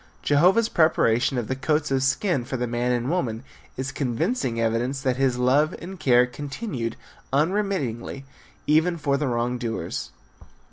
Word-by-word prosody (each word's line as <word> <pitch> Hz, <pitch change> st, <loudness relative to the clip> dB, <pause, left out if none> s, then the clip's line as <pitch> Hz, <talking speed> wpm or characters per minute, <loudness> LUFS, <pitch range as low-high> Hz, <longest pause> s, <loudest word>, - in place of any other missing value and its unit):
Jehovah's 180 Hz, +10 st, +4 dB
preparation 135 Hz, -, +2 dB
of 120 Hz, -3 st, -2 dB
the 130 Hz, -, -1 dB
coats 150 Hz, +2 st, 0 dB
of 135 Hz, -1 st, +2 dB
skin 135 Hz, +2 st, +1 dB
for 130 Hz, +2 st, -4 dB
the 125 Hz, -, -1 dB
man 120 Hz, +1 st, -1 dB
and 120 Hz, 0 st, 0 dB
woman 125 Hz, -10 st, -1 dB, 0.3 s
is 130 Hz, +1 st, -3 dB
convincing 135 Hz, -, -1 dB
evidence 115 Hz, +4 st, 0 dB
that 130 Hz, -2 st, +1 dB
his 135 Hz, -2 st, +1 dB
love 135 Hz, +5 st, +2 dB
and 185 Hz, +1 st, -9 dB
care 125 Hz, -3 st, +5 dB
continued 135 Hz, -, -5 dB, 0.4 s
unremittingly 145 Hz, -, -1 dB, 0.4 s
even 160 Hz, +3 st, +3 dB
for 145 Hz, -3 st, 0 dB
the 145 Hz, 0 st, -1 dB
wrong 120 Hz, 0 st, -1 dB
doers. 115 Hz, -2 st, -4 dB
135 Hz, 150 wpm, -24 LUFS, 120-155 Hz, 0.4 s, care